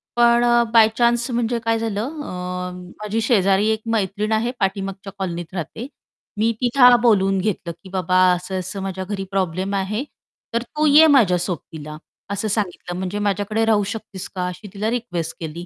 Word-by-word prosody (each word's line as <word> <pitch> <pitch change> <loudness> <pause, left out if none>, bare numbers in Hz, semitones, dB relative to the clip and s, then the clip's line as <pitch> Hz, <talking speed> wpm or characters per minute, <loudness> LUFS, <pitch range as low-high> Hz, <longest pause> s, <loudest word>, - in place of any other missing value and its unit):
पण 235 0 +4
अ, 240 0 +4
by 225 -1 +7
chance 240 +1 +2
म्हणजे 235 0 0
काय 225 0 +2
झालं 220 -2 -2 0.3
अ, 180 0 -4 0.3
माझी 210 +2 -1
शेजारी 200 -3 +3
एक 220 0 0
मैत्रीण 210 +1 -1
आहे, 220 +2 +1
पाठीमागच्या 195 0 -2
कॉलनीत 175 -2 -4
राहते. 195 - -5 0.5
मी 225 +2 +2
तिला 245 0 +6
बोलवून 195 -5 +3
घेतलं, 185 -3 -2
की 190 - -11
"बाबा 185 -1 0 0.2
असं-असं 185 +2 -4
माझ्या 190 -1 -4
घरी 195 0 -4
प्रॉब्लेम 190 0 -1
आहे. 205 +6 -1 0.5
तर 235 - +1
तू 300 +5 -2
ये 305 +2 +7
माझ्या 235 - +5
सोबतीला" 160 -4 -6 0.3
असं 205 +2 -2
सांगितलं. 190 -4 -3
"म्हणजे 190 +2 -3
माझ्याकडे 205 +2 0
राहू 215 -2 +3
शकतेस 210 -4 -8
का?" 180 - -1
अशी 180 +4 -7
तिला 210 +2 -2
रिक्वेस्ट 180 -9 -3
केली. 165 +1 -6
200 Hz, 165 wpm, -21 LUFS, 185-225 Hz, 0.5 s, by